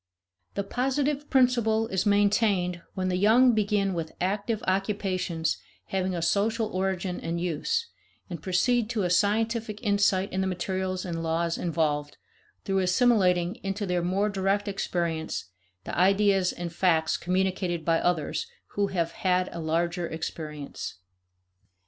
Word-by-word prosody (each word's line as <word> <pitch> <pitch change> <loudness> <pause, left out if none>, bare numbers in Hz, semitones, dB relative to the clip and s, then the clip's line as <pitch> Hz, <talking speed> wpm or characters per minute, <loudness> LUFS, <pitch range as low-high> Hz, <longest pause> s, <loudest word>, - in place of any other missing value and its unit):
The 200 - -1
positive 275 +6 -1
principle 235 -4 +3
is 190 +2 0
maintained 200 -3 +2
when 185 -1 -1
the 180 - 0
young 235 +6 +5
begin 205 -2 +1
with 165 -2 -4
active 205 +4 -1
occupations 185 -4 -1 0.3
having 185 -1 -1
a 170 - -2
social 215 +5 +1
origin 185 -1 -1
and 170 +1 -3
use, 175 - -1 0.4
and 170 -5 -7
proceed 215 +6 +1
to 220 -4 -1
a 175 - 0
scientific 215 +3 +1
insight 200 -3 +2
in 190 - 0
the 190 - 0
materials 185 0 -2
and 170 -2 -3
laws 165 +1 0
involved, 150 -4 -1 0.5
through 195 -1 +1
assimilating 185 -2 +3
into 195 +2 -2
their 180 -2 0
more 190 +4 +1
direct 200 +1 0
experience 170 - -2 0.3
the - - -5
ideas 195 0 +3
and 175 -1 -6
facts 165 -3 +2
communicated 180 -2 -1
by 165 -1 +3
others 175 - 0 0.2
who 205 0 0
have 170 -4 -1
had 185 -1 +1
a 170 - -6
larger 170 +2 -1
experience. 150 - -6
190 Hz, 135 wpm, -27 LUFS, 175-205 Hz, 0.5 s, young